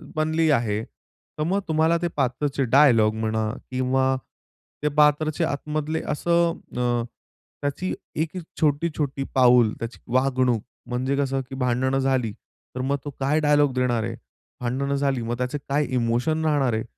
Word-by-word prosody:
बनली 160 +1 +1
आहे 110 -5 +1
तर, 150 - -10
मग 190 +5 +1
तुम्हाला 160 +1 +3
ते 175 - +1
पात्रचे 135 +2 0
डायलॉग 120 -4 +5
म्हणा 110 0 -1 0.2
किंवा 130 +1 +1 0.7
ते 150 - +3
पात्रचे 150 +2 +3
आतमधले 155 +1 -2
असं 170 +2 +1 0.2
अ, 120 -1 +1 0.6
त्याची 145 +6 -2 0.2
एक 160 +4 -2 0.2
छोटी-छोटी 145 -2 0
पाऊल 125 -4 +5
त्याची 115 +1 -6
वागणूक. 130 -3 +2 0.3
म्हणजे, 130 +3 -1
कसं, 135 -1 0
की 135 - -6
भांडणं 130 +1 +1
झाली 130 -5 +1
तर, 125 +4 -11
मग 140 +2 0
तो - - -3
काय 140 +3 +2
डायलॉग 145 -3 +3
देणार 125 -3 +1
आहे? - - -3 0.5
भांडणं 135 +3 -1
झाली, 135 -3 0
मग 120 +1 -3
त्याचे 125 +3 -2
काय 145 +2 +2
इमोशन 125 +7 +1
राहणार 140 -6 +2
आहे? 110 - -1
135 Hz, 145 wpm, -24 LUFS, 125-150 Hz, 0.7 s, डायलॉग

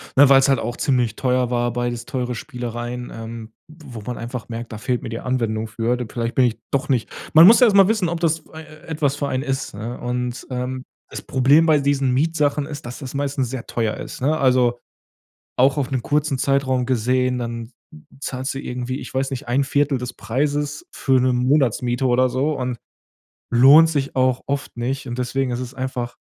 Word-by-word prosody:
ne, 140 0 +7
weil's 135 0 +6
halt 135 -1 +3
auch 120 - -4
ziemlich 125 -6 0
teuer 125 -1 +1
war, 120 -1 0
beides 120 -1 -3
teure 125 -2 -3
Spielereien, 120 -1 -6
ähm, 115 0 -8 0.2
w 155 -1 -15
wo 110 - -6
man 125 - -3
einfach 120 0 -6
merkt, 115 0 -6
da 110 - -6
fehlt 120 +4 -2
mir - - -5
die 115 0 -4
Anwendung 115 -4 -1
für. 115 +2 -1
Vielleicht 115 0 -3
bin 130 - +5
ich 115 -2 -1
doch 140 +2 0
nicht 125 -5 0 0.2
man 160 +2 +9
muss 225 +5 +8
ja 250 - +7
erst 205 - +2
mal 195 0 +7
wissen, 215 -5 +1
ob 170 0 -3
das, 165 -1 +1
äh, 160 - -8
äh, 155 -1 -15
etwas 145 -3 -1
für 145 - -2
einen 130 -1 -2
ist, 135 -1 -3
ne, 115 +4 -6
und, 125 0 -3
ähm, 130 0 -4 0.2
das - - -7
Problem 140 +5 +4
bei 155 -2 +4
diesen 140 -2 +1
Mietsachen 150 0 +1
ist, 145 -3 -8
dass 120 +1 -7
das 135 -4 -7
meistens 140 -2 -1
sehr 130 -3 -6
teuer 115 -2 -1
ist, - - -8
ne? 150 +4 +2
Also, 125 -4 +2 0.8
auch 135 +2 +4
auf 140 -2 -1
'nem 130 -2 0
kurzen 150 +1 0
Zeitraum 130 -2 +1
gesehen, 125 +1 +1
dann 115 -1 -5
z 120 - -27 0.5
zahlst 130 -1 -3
du 135 - -5
irgendwie, 125 0 -4
ich - - -9
weiß 135 +1 -1
nicht, 130 -3 -5
1/4 140 +2 +1
des 125 0 -6
Preises 145 +4 -2
für 130 -1 +2
'ne 130 0 +2
Monatsmiete 125 -1 +1
oder 125 +1 +3
so 140 +4 -1
und 125 -1 -3 0.7
lohnt 140 +7 +7
sich 140 -3 -2
auch 130 -1 +2
oft 140 -2 -4
nicht 130 +3 -3
und 120 0 -5
deswegen 125 +1 -1
ist 120 - -2
es 125 0 -7
einfach 130 -2 -4
130 Hz, 210 wpm, -21 LUFS, 120-140 Hz, 0.8 s, man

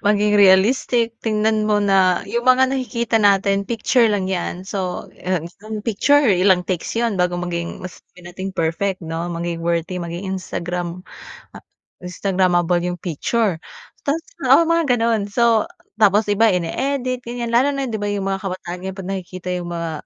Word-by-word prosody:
maging 210 0 +2
realistic. 225 +4 +4
Tingnan 215 -1 0
muna 195 -3 +3
yung 235 +5 -2
mga 260 +1 +5
nakikita 235 -4 -1
natin, 200 -1 +2
picture 235 +1 +2
lang 205 -3 0
'yan. 185 -1 -3
So, 190 -2 -4 0.2
ah, 185 +1 -1 0.5
picture 285 +6 +3
ilang 185 -3 +3
takes 180 +3 -3
yun 230 -5 0
bago 180 0 +1
maging 170 -1 -4
masabi 180 0 -12
nating 185 +2 -7
perfect 175 +3 -1
'no. 165 +2 -4
Maging 170 0 -4
worthy, 170 +2 -2
maging 175 +3 -5
Instagram, 175 0 -5 0.5
ah, - - -11 0.4
Instagramable 180 -1 +1
yung 175 - -2
picture, 185 +2 -1 0.5
tas, 290 +3 +1 0.3
oo, - - +7
mga 330 -6 +2
ganun 230 -2 +1
so, 230 -1 +3 0.4
tapos 210 0 +4
iba 220 +2 +4
ini-edit, 255 +8 -2
ganyan. 235 0 -4
Lalo 255 +5 +3
na 275 - -2
di 220 -2 -3
'ba, 205 - -2
yung 200 -1 -2
mga 195 +1 -3
kabataan 180 -1 -6
ngayon, 190 0 -5
'pag 190 -1 -7
nakikita 185 -1 -6
yung 175 0 -6
mga 170 -1 -3
195 Hz, 155 wpm, -20 LUFS, 180-230 Hz, 0.5 s, oo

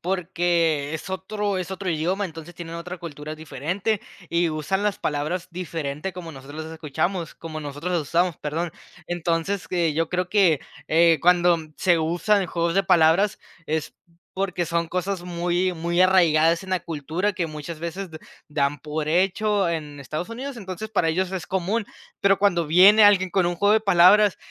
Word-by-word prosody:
porque 170 -5 0
es 160 - -5
otro 200 +2 -2
es 185 0 -4
otro 190 0 -4
idioma, 180 +5 0
entonces 165 -1 -8
tienen 170 -1 -8
otra 175 +2 -6
cultura 155 -2 -7
diferente 165 - -2 0.3
y 170 0 +1
usan 155 +6 -2
las 210 -1 0
palabras 155 +5 -2
diferentes 165 -1 -4
como 170 -2 -8
nosotros 145 +4 -8
las 160 - -8
escuchamos, 160 +3 -3
como 155 -1 -7
nosotros 145 +5 -5
las 170 -3 +1
usamos, 170 +2 +1
perdón. 160 +3 -3 0.3
Entonces, 175 +2 -2
eh, 170 -4 +1
yo 165 +1 0
creo 180 0 -1
que, 180 -7 +4 0.3
eh, 165 0 +5
cuando 175 -1 +4 0.2
se 175 -3 +3
usan 180 +5 +1
juegos 170 0 -1
de 195 - +3
palabras 170 +4 +3 0.3
es 155 0 -2 0.4
porque 185 -2 -1
son 170 +1 0
cosas 185 +1 -2
muy 175 +1 -1
muy 170 +1 -2
arraigadas 170 -2 +4
en 190 - -11
la 185 -1 0
cultura 165 +6 -2
que 180 -3 -2
muchas 155 +1 -7
veces 175 +2 -5
d 155 - -9 0.3
dan 145 -1 0
por 150 0 -4
hecho 195 +4 +2
en 150 -3 -5
Estados 155 +5 -5
Unidos. 250 +2 -6
Entonces 190 +2 -6
para 180 -6 +1
ellos 185 +3 0
es 185 -3 -4
común, 195 +4 -1 0.3
pero 195 -1 +4
cuando 175 -5 +2
viene 190 +7 +7
alguien 195 -3 +5
con 185 -3 +2
un 175 0 -1
juego 205 +4 +3
de 220 - +4
palabras 195 +1 +5
175 Hz, 175 wpm, -24 LUFS, 160-190 Hz, 0.4 s, viene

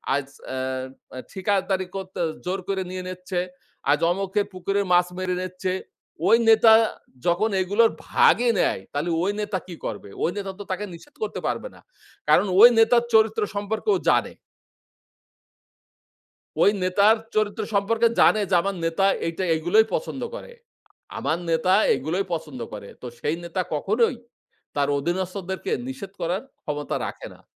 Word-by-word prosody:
আজ 140 -1 -2 0.3
আ - - -3 0.6
আ - - -7
ঠিকাদারি 190 -1 0
করতে 190 -1 -6 0.3
জোর 185 +2 -1
করে 195 -1 -1
নিয়ে 185 0 -5
নিচ্ছে। 180 0 -4 0.5
আজ 150 - +3
অমুকের 195 +2 0
পুকুরে 195 +2 -1
মাছ 175 0 +5
মেরে 185 -1 -1
নিচ্ছে। 185 0 -3 0.5
ওই 230 - +7
নেতা 220 0 +7 0.5
যখন 190 +6 +2
এগুলোর 205 +5 +3 0.2
ভাগই 240 0 +4
নেয়, - - +1
তাহলে 150 +4 -1
ওই 200 - +1
নেতা 205 -2 -2
কি 175 - -7
করবে? 100 -2 -5
ওই - - +2
নেতা 195 -1 -3
তো - - -5
তাকে 195 +3 -2
নিষেধ 290 - -14
করতে - - -3
পারবে - - -2
না। - - -16 0.5
কারণ - - +5
ওই 235 - +11
নেতার 235 +1 +5
চরিত্র 220 0 +4
সম্পর্কেও 220 - 0
জানে। - - +2 2.3
ওই - - +7
নেতার 200 +4 +4 0.2
চরিত্র 215 0 0
সম্পর্কে 225 +4 +3
জানে 215 - +5
যে, - - -2
আমার 200 +1 -2
নেতা 165 +4 +1 0.2
এইটা 165 +3 -3
এইগুলোই 175 +8 +3
পছন্দ - - -3
করে। - - -9 0.7
আমার 160 - 0
নেতা 165 +3 +2 0.2
এগুলোই 175 +8 -2
পছন্দ 155 -6 -5
করে। 100 -1 -8
তো - - -9
সেই 155 - -1
নেতা 170 +2 -2
কখনোই 220 - +1 0.6
তার 140 -1 +1
অধীনস্থদেরকে 185 +3 -3 0.2
নিষেধ 215 -8 -7
করার 175 +4 -1 0.2
ক্ষমতা 150 -1 -3
রাখে - - -7
না। - - -19
190 Hz, 150 wpm, -24 LUFS, 175-210 Hz, 2.3 s, ওই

